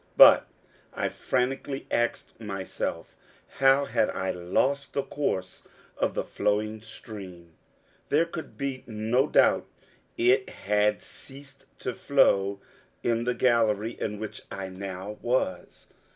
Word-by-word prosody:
But, -, -, +9 dB, 0.5 s
I -, -, 0 dB
frantically 135 Hz, +2 st, -2 dB
asked 120 Hz, -1 st, -1 dB
myself, 95 Hz, -4 st, -4 dB, 0.4 s
how 135 Hz, +1 st, +5 dB
had 110 Hz, -, +1 dB
I 95 Hz, 0 st, -2 dB
lost 130 Hz, +11 st, 0 dB
the 140 Hz, -, 0 dB
course 135 Hz, -10 st, -2 dB, 0.3 s
of -, -, -1 dB
the -, -, 0 dB
flowing 105 Hz, +1 st, -1 dB
stream? 95 Hz, -6 st, -10 dB, 0.6 s
There 155 Hz, +4 st, +4 dB
could 170 Hz, -1 st, -8 dB
be 135 Hz, -2 st, -3 dB
no 115 Hz, +5 st, +1 dB
doubt -, -, +4 dB, 0.5 s
it 130 Hz, +2 st, +3 dB
had 105 Hz, +1 st, +1 dB
ceased 135 Hz, 0 st, -11 dB
to 125 Hz, -, -3 dB
flow 100 Hz, -9 st, +3 dB, 0.4 s
in 115 Hz, 0 st, +1 dB
the 125 Hz, 0 st, 0 dB
gallery 115 Hz, -3 st, +2 dB
in 105 Hz, -1 st, -2 dB
which 110 Hz, 0 st, -6 dB
I 95 Hz, -1 st, -5 dB
now 95 Hz, +2 st, -6 dB
was. 120 Hz, -5 st, -1 dB
115 Hz, 125 wpm, -27 LUFS, 100-135 Hz, 0.6 s, But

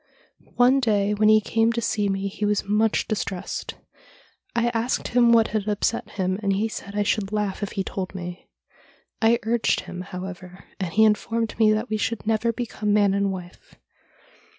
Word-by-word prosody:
One 250 Hz, +2 st, +5 dB
day 210 Hz, -4 st, +1 dB
when 215 Hz, +1 st, +3 dB
he 215 Hz, 0 st, +7 dB
came 225 Hz, +2 st, +1 dB
to 235 Hz, -, -1 dB
see 210 Hz, -3 st, 0 dB
me 195 Hz, 0 st, -1 dB
he 200 Hz, +2 st, -6 dB
was 210 Hz, 0 st, +1 dB
much 210 Hz, +2 st, +1 dB
distressed. 195 Hz, -4 st, -4 dB, 0.8 s
I 235 Hz, 0 st, +2 dB
asked 235 Hz, +1 st, -1 dB
him 240 Hz, -1 st, +4 dB
what 230 Hz, -1 st, +5 dB
had 215 Hz, -1 st, -2 dB
upset 210 Hz, +2 st, -1 dB
him, 185 Hz, -1 st, -2 dB
but 200 Hz, -2 st, +1 dB
he 205 Hz, +3 st, 0 dB
said 200 Hz, -2 st, -8 dB
I 205 Hz, -, +2 dB
should 205 Hz, -1 st, -1 dB
laugh 210 Hz, -2 st, -2 dB
if 205 Hz, -, -4 dB
he 195 Hz, -, -1 dB
told 190 Hz, 0 st, -5 dB
me. 180 Hz, -1 st, -7 dB, 0.7 s
I 230 Hz, +1 st, +4 dB
urged 230 Hz, +1 st, +1 dB
him, 180 Hz, -, -8 dB
however, 185 Hz, 0 st, -8 dB, 0.2 s
and 185 Hz, -4 st, -3 dB
he 220 Hz, +4 st, +4 dB
informed 225 Hz, +1 st, 0 dB
me 215 Hz, -1 st, +5 dB
that 220 Hz, +2 st, -2 dB
we 215 Hz, -, +1 dB
should 225 Hz, +1 st, -2 dB
never 225 Hz, +1 st, +1 dB
become 225 Hz, -3 st, -3 dB
man 205 Hz, -1 st, +4 dB
and 200 Hz, 0 st, +1 dB
wife. 180 Hz, -1 st, -10 dB
210 Hz, 185 wpm, -24 LUFS, 195-225 Hz, 0.8 s, he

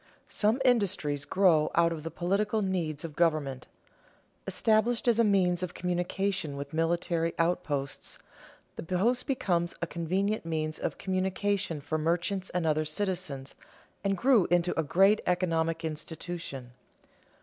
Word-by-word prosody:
_ -, -, -33 dB, 0.2 s
Some 220 Hz, +5 st, +1 dB
industries 190 Hz, -, +1 dB
grow 160 Hz, -2 st, +3 dB
out 170 Hz, 0 st, +4 dB
of 160 Hz, -, -6 dB
the 165 Hz, -, -5 dB
political 205 Hz, +5 st, 0 dB
needs 165 Hz, -6 st, -2 dB
of 155 Hz, -3 st, -8 dB
government. 150 Hz, -6 st, 0 dB, 0.8 s
Established 225 Hz, +2 st, +2 dB
as 235 Hz, -1 st, +4 dB
a -, -, +6 dB
means 185 Hz, -4 st, +2 dB
of 180 Hz, -2 st, -4 dB
communication 180 Hz, -2 st, -2 dB
with 140 Hz, +1 st, -7 dB
military 165 Hz, +1 st, 0 dB
outposts, 145 Hz, -5 st, -2 dB, 0.6 s
the -, -, -4 dB
post 205 Hz, -, 0 dB
became 175 Hz, -, +1 dB
a -, -, -1 dB
convenient 185 Hz, +6 st, -1 dB
means 155 Hz, -1 st, -2 dB
of -, -, -3 dB
communication 190 Hz, -2 st, -1 dB
for 155 Hz, +2 st, -2 dB
merchants 175 Hz, +4 st, -1 dB
and 180 Hz, -2 st, -1 dB
other 155 Hz, 0 st, +2 dB
citizens 155 Hz, -5 st, -3 dB, 0.5 s
and 195 Hz, -1 st, +1 dB
grew 240 Hz, -4 st, +4 dB
into 175 Hz, 0 st, +2 dB
a -, -, +2 dB
great 195 Hz, +8 st, +4 dB
economic 165 Hz, -2 st, 0 dB
institution. 155 Hz, -4 st, -6 dB
175 Hz, 140 wpm, -29 LUFS, 160-195 Hz, 0.8 s, a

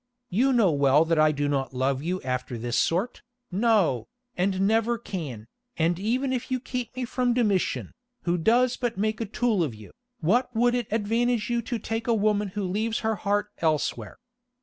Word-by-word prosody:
You 250 Hz, +9 st, +3 dB
know 225 Hz, -8 st, +4 dB
well 140 Hz, +1 st, +4 dB
that 165 Hz, -1 st, +1 dB
I 155 Hz, 0 st, +5 dB
do 145 Hz, -1 st, -1 dB
not 135 Hz, -3 st, -1 dB
love 130 Hz, +1 st, 0 dB
you 180 Hz, +4 st, -2 dB
after 125 Hz, -1 st, -3 dB
this 120 Hz, +1 st, -3 dB
sort, 180 Hz, -, 0 dB, 0.3 s
no, 200 Hz, -, +2 dB, 0.3 s
and 190 Hz, +1 st, 0 dB
never 225 Hz, +4 st, +2 dB
can, 150 Hz, -, -6 dB, 0.3 s
and 170 Hz, +2 st, +1 dB
even 255 Hz, +6 st, 0 dB
if 250 Hz, -1 st, -3 dB
you 255 Hz, -1 st, 0 dB
keep 250 Hz, -1 st, -5 dB
me 255 Hz, -1 st, -2 dB
from 245 Hz, 0 st, 0 dB
Domitian, 210 Hz, -7 st, 0 dB, 0.3 s
who 175 Hz, 0 st, 0 dB
does 240 Hz, +7 st, +3 dB
but 240 Hz, -4 st, -2 dB
make 215 Hz, +2 st, -1 dB
a 225 Hz, -, -2 dB
tool 220 Hz, -3 st, +1 dB
of 135 Hz, -8 st, -3 dB
you, 105 Hz, -1 st, -13 dB, 0.3 s
what 225 Hz, +10 st, +2 dB
would 240 Hz, +2 st, +3 dB
it 245 Hz, -3 st, -1 dB
advantage 225 Hz, +1 st, 0 dB
you 235 Hz, 0 st, +1 dB
to 235 Hz, +1 st, -3 dB
take 225 Hz, +2 st, -4 dB
a 235 Hz, -, +3 dB
woman 210 Hz, -1 st, +1 dB
who 200 Hz, +2 st, -4 dB
leaves 215 Hz, +5 st, -1 dB
her 220 Hz, 0 st, +1 dB
heart 205 Hz, +1 st, -1 dB
elsewhere? 155 Hz, -3 st, -1 dB
205 Hz, 190 wpm, -26 LUFS, 160-235 Hz, 0.3 s, I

